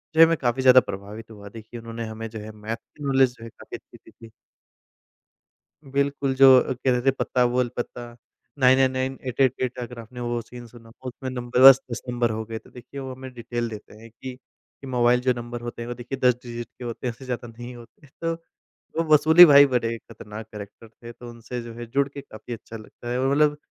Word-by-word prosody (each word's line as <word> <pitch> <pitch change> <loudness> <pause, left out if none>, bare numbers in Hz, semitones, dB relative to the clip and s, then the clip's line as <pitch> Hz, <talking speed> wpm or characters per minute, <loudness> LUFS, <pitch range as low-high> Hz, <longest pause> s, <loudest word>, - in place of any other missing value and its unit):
जो - - +1
है - - +11
मैं 165 0 +1
काफ़ी 125 -1 -1
ज़्यादा 130 0 +8
प्रभावित 105 +3 -8
हुआ। 100 -2 -11
देखिए 115 +2 -10
उन्होंने 115 0 -6
हमें 110 +1 -6
जो 110 0 -8
है 110 +1 -8
मैथ 110 +1 -5
की 145 +5 -16
नॉलेज 135 -2 +3
जो - - -13
है 115 - -8
काफ़ी - - -10
अच्छी - - -19
दी - - -20
थी। 115 0 -15 1.5
बिल्कुल 140 -1 -1
जो 135 0 +8
अ, - - -2
कहते 125 -1 0
थे, 135 - +7
"पत्ता 125 -1 0
बोल 125 0 0
पत्ता।" 120 -1 -6 0.4
999 130 0 +3
888 130 -1 0
अगर 120 0 -7
आपने 115 +2 -10
वो 120 0 -2
सीन 120 +1 -11
सुना 115 -1 -16 0.2
उसमें 130 +1 -6
नंबर 125 0 -2
बस 135 0 +8
10 115 - -5
नंबर 120 -1 0
हो 110 0 -3
गए, 110 0 -6
तो - - -20
देखिए 125 +3 -10
वो 130 -1 -6
हमें 130 0 -10
डिटेल 120 0 -4
देते 110 -2 -10
हैं 115 0 -13
कि 130 +3 -9 0.5
कि 135 - -10
मोबाइल 125 -1 +3
जो 125 0 +2
नंबर 120 0 -6
होते 120 0 -6
हैं - - -6
वो 120 - -4
देखिए 120 +2 -6
10 125 -1 +5
डिजिट 120 -1 -6
के 125 - -8
होते 120 +1 -5
हैं, 120 - -1
उससे 115 +3 -13
ज़्यादा 125 -1 -5
नहीं 120 +2 -9
होते। 120 +5 -16 0.2
तो 165 0 0 0.7
वो 165 - +2
वसूली 160 +4 +9
भाई 145 -3 +8
बड़े 115 -3 -1
खतरनाक 105 0 -10
कैरेक्टर 105 +2 -10
थे, 115 +1 -12
तो 120 +1 -11
उनसे 120 +1 -7
जो 115 -1 -9
है 120 +1 -7
जुड़ 135 +4 0
के 140 - -9
काफ़ी 110 -1 -10
अच्छा 115 0 -9
लगता 115 +2 -11
है। 125 - -1
और 135 +1 +1
मतलब 150 +1 +3
120 Hz, 225 wpm, -24 LUFS, 115-130 Hz, 1.5 s, है